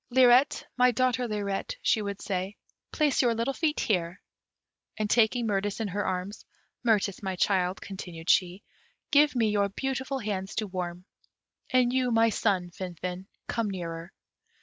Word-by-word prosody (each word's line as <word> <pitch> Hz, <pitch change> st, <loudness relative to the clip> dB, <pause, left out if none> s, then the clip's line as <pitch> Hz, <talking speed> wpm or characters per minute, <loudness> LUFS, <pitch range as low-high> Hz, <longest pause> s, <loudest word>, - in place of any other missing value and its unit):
"Lirette, 255 Hz, +2 st, +5 dB
my 250 Hz, 0 st, +6 dB
daughter 250 Hz, 0 st, +1 dB
Lirette," 205 Hz, -, -3 dB
she 220 Hz, -, +3 dB
would 200 Hz, -1 st, -4 dB
say, 190 Hz, 0 st, -3 dB, 0.3 s
"place 300 Hz, -3 st, +2 dB
your 240 Hz, -3 st, +2 dB
little 230 Hz, +4 st, -1 dB
feet 310 Hz, +1 st, 0 dB
here." 180 Hz, -3 st, -1 dB, 0.8 s
And 215 Hz, -1 st, 0 dB
taking 235 Hz, +2 st, +3 dB
Mirtis 205 Hz, -1 st, -1 dB
in 220 Hz, -, -1 dB
her 205 Hz, +2 st, -2 dB
arms, 185 Hz, +2 st, -3 dB, 0.4 s
"Mirtis, 210 Hz, -4 st, +1 dB
my 190 Hz, -2 st, -3 dB
child," 185 Hz, -1 st, +1 dB
continued 175 Hz, -4 st, -8 dB
she, 180 Hz, +1 st, +2 dB, 0.5 s
"give 290 Hz, -1 st, +5 dB
me 225 Hz, -3 st, +2 dB
your 200 Hz, -1 st, +2 dB
beautiful 265 Hz, +4 st, -3 dB
hands 200 Hz, -5 st, -4 dB
to 220 Hz, -, -1 dB
warm; 180 Hz, -2 st, -5 dB, 0.6 s
and 250 Hz, -1 st, +3 dB
you 255 Hz, -1 st, +2 dB
my 230 Hz, -1 st, +4 dB
son, 190 Hz, -5 st, 0 dB
Finfin, 180 Hz, +1 st, -6 dB, 0.2 s
come 230 Hz, -3 st, -1 dB
nearer." 170 Hz, -2 st, -5 dB
205 Hz, 150 wpm, -28 LUFS, 185-245 Hz, 0.8 s, my